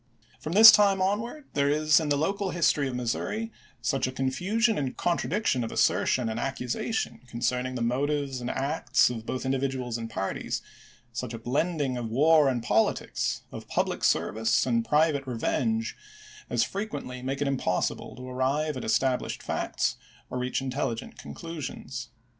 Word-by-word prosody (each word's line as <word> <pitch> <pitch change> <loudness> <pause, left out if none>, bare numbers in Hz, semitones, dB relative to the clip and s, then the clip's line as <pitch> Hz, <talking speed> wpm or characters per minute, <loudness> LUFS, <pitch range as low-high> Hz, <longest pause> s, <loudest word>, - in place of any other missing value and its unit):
^ - - -33
From 155 - -4
this 220 +3 +12
time 200 -2 +4
on 195 +2 +2
ward 270 +5 -8
there 140 0 +2
is 155 +1 +4
in 155 -2 -2
the 145 - +2
local 195 +6 0
history 155 -5 +2
of 130 - -4
Missouri 205 - -2 0.3
such 130 +3 +1
a - - -3
confusion 185 - +1
and 135 -3 -3
contradiction 175 - 0
of 115 - -4
assertion 125 -3 +2
and 110 +1 -2
accusation 125 - -2
concerning 125 +1 -1
the 120 - -1
motives 135 +2 -1
and 120 - -3
acts 135 -3 +2
of 115 -2 -7
both 130 - -3
individuals 130 -3 -1
and 115 0 -5
parties, 95 -2 -3 0.5
such 115 -1 -4
a - - -5
blending 140 +3 -1
of 120 -2 -4
war 150 +4 +5
and 120 -3 -1
politics, 110 -1 0
of - - -8
public - - -1
service 115 +3 +2
and 115 -2 +1
private 150 0 +2
revenge, 225 - -1 0.5
as - - +2
frequently 145 -11 -5
make 135 +2 -3
it 145 - 0
impossible 125 -10 -1
to 130 0 -9
arrive 135 +4 0
at 130 - -5
established 130 +2 0
facts - - -1 0.3
or 125 - -2
reach 125 +1 -1
intelligent 130 -3 -3
conclusions. 130 - -7
135 Hz, 160 wpm, -27 LUFS, 125-155 Hz, 0.5 s, this